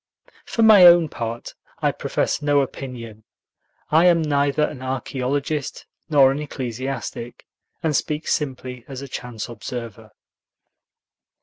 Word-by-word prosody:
For 230 - 0
my 215 -4 +8
own 170 -2 +6
part, 115 -2 -5 0.3
I - - +2
profess - - -2
no 145 -1 +3
opinion. 120 -5 -7 0.7
I 160 +3 +5
am 170 -2 +4
neither 145 0 +1
an 140 -3 -3
archaeologist 135 +3 -3 0.2
nor 140 -3 +6
an 140 - -3
ecclesiastic, 125 -3 -5 0.4
and 155 -2 +1
speak 150 +3 -2
simply 130 -4 -3
as 135 0 -7
a - - -7
chance 120 -4 -6
observer. 115 -1 -7
135 Hz, 120 wpm, -22 LUFS, 120-150 Hz, 0.7 s, my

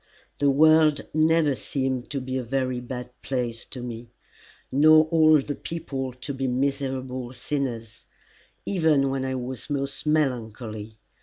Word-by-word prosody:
The 145 - +3
world 155 +1 +5
never 155 -2 +3
seemed 130 -2 -2
to 140 - -2
be 130 0 -4
a 130 - 0
very 130 0 -1
bad 125 0 -7
place 120 -3 -3
to 125 - -8
me, 120 -1 -7 0.6
nor 155 +3 +6
all 155 -1 +6
the 145 +1 -3
people 140 -5 -5
to 125 +3 -6
be 135 0 -2
miserable 130 -1 -2
sinners, 120 -7 -4 0.6
even 155 -7 +2
when 135 -1 -2
I 130 0 -2
was 130 +2 -6
most 140 0 -3
melancholy. 115 -7 -1
135 Hz, 140 wpm, -25 LUFS, 125-145 Hz, 0.6 s, nor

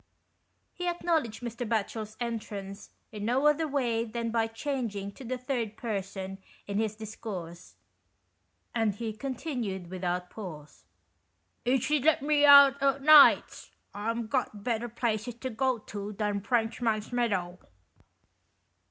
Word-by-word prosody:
He 355 - -5
acknow 345 -2 +1
ledged 230 -1 -9
Mr. 235 0 -4
Batchel's 215 -1 -2
entrance 210 -4 -5 0.2
in 210 -1 -6
no 250 +6 +1
other 300 +2 +3
way 245 -6 0
than 230 0 -3
by 225 -1 +1
changing 225 -5 -3
to 265 - -12
the 255 +1 -3
third 245 -4 -3
person 195 -3 -4 0.3
in 200 0 -2
his 220 -1 -1
discourse, 200 -6 -8 1.0
and 225 -4 +1
he 225 0 -4
continued 235 - -4
without 180 -1 -3
pause 155 -8 -9 0.3
— - - -46
" - - -46
if 250 0 +2
she'd 295 0 +1
let 315 -3 +4
me 295 0 +4
out 280 -1 +8
o' 275 0 +3
nights, 295 +1 +6 0.2
I'm 230 +3 -2
got 220 -4 -2
better 240 0 -1
places 225 0 -2
to 260 +2 -5
go 255 +2 +1
to 210 -1 -7
than 205 0 -1
Frenchman's 225 0 0
Meadow. 190 -7 -1
225 Hz, 140 wpm, -29 LUFS, 205-255 Hz, 1.0 s, out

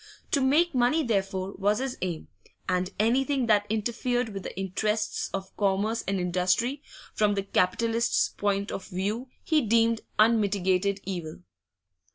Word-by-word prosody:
To 280 - +2
make 305 +6 +3
money, 255 +5 +2
therefore, 195 -4 -1
was 205 +2 +2
his 260 0 -3
aim, 175 -4 -3 0.4
and 180 0 0
anything 260 +4 +2
that 210 -2 +3
interfered 240 +3 -1
with 195 -2 -6
the 185 - -7
interests 210 +3 -1
of 195 -1 -6
commerce 205 +3 +1
and 195 0 0
industry 185 +10 0 0.3
from 210 -1 +2
the 195 - -1
capitalist's 225 +5 +1
point 200 0 -1
of 190 - -6
view 205 +7 -3 0.2
he 315 -2 +2
deemed 230 0 +2 0.2
unmitigated 200 -3 +2
evil. 170 - -5
210 Hz, 140 wpm, -27 LUFS, 190-235 Hz, 0.4 s, make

